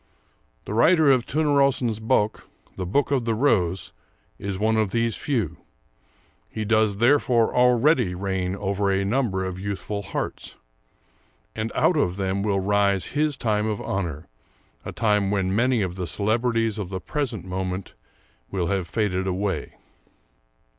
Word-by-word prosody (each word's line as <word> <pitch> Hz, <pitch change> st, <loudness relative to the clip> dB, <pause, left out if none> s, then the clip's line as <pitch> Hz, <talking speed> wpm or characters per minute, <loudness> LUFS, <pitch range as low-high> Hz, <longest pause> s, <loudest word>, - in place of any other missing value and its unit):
The -, -, -5 dB
writer 155 Hz, +5 st, +5 dB
of 130 Hz, -2 st, +2 dB
'Törnrosens 140 Hz, -6 st, +1 dB
Bok' 110 Hz, -1 st, 0 dB, 0.3 s
[The 90 Hz, -, -4 dB
Book 140 Hz, +10 st, +1 dB
of 130 Hz, -4 st, +1 dB
the 115 Hz, -1 st, 0 dB
Rose] 95 Hz, -8 st, +1 dB, 0.5 s
is 100 Hz, -1 st, -4 dB
one 110 Hz, +3 st, +1 dB
of 110 Hz, -2 st, +1 dB
these 115 Hz, +2 st, 0 dB
few; 110 Hz, -, -2 dB, 0.9 s
he 110 Hz, -, -4 dB
does 110 Hz, -2 st, +2 dB
therefore 120 Hz, -1 st, +3 dB
already 125 Hz, -, +3 dB
reign 95 Hz, -1 st, -2 dB
over 100 Hz, 0 st, -1 dB
a 95 Hz, 0 st, +1 dB
number 100 Hz, -4 st, 0 dB
of 95 Hz, 0 st, -5 dB
youthful 100 Hz, +1 st, -4 dB
hearts, 100 Hz, 0 st, -5 dB, 1.0 s
and 110 Hz, 0 st, -3 dB
out 175 Hz, -, +3 dB
of 90 Hz, -11 st, +1 dB
them 95 Hz, 0 st, -1 dB
will 100 Hz, -1 st, +1 dB
rise 100 Hz, -2 st, +1 dB
his 150 Hz, -1 st, +1 dB
time 105 Hz, -3 st, 0 dB
of 105 Hz, -2 st, -2 dB
honor, 85 Hz, -5 st, -4 dB, 0.6 s
a -, -, -6 dB
time 105 Hz, -3 st, +1 dB
when 95 Hz, -1 st, 0 dB
many 120 Hz, -1 st, +2 dB
of 90 Hz, -2 st, -3 dB
the 90 Hz, -1 st, -4 dB
celebrities 115 Hz, +3 st, 0 dB
of 95 Hz, -4 st, -4 dB
the 95 Hz, -1 st, -4 dB
present 120 Hz, -, -3 dB
moment 95 Hz, 0 st, -4 dB, 0.6 s
will 90 Hz, -3 st, -2 dB
have 95 Hz, -3 st, -2 dB
faded 95 Hz, -1 st, -1 dB
away." 95 Hz, -4 st, -2 dB
105 Hz, 145 wpm, -24 LUFS, 95-115 Hz, 1.0 s, writer